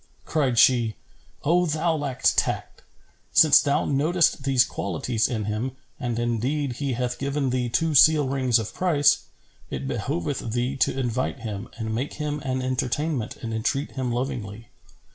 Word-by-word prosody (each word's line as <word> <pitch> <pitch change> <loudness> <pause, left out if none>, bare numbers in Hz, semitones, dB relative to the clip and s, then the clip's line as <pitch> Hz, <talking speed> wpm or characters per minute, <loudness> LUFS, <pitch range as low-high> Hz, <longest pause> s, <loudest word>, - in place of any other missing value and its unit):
Cried 135 -6 0
she, 120 -3 +4 0.5
"O 175 +3 +3
thou 160 +2 0
lack 140 -4 -4
tact,[FN#409] - - -2 0.5
since 155 -2 +7
thou 140 0 +1
notest 155 +2 +2
these 135 -2 +4
qualities 110 - -1
in 110 -5 -3
him, 110 +5 -2 0.3
and 120 -2 -2
indeed 120 +3 -1
he 140 -3 -2
hath 125 0 -2
given 140 -1 -1
thee 125 -1 -1
two 160 +6 +1
seal 150 0 +6
rings 130 -3 +2
of 110 -2 -4
price, 160 -6 +2 0.4
it 65 0 -4
behoveth 110 - -3
thee 125 +3 -1
to 135 - +1
invite 125 0 -2
him 105 -1 -5
and 110 -1 -3
make 130 +6 -3
him 150 -1 -3
an 130 -2 -3
entertainment 130 0 -2
and 115 -1 -4
entreat 135 +6 -1
him 130 -2 -3
lovingly. 115 -4 -4
130 Hz, 155 wpm, -24 LUFS, 115-145 Hz, 0.5 s, since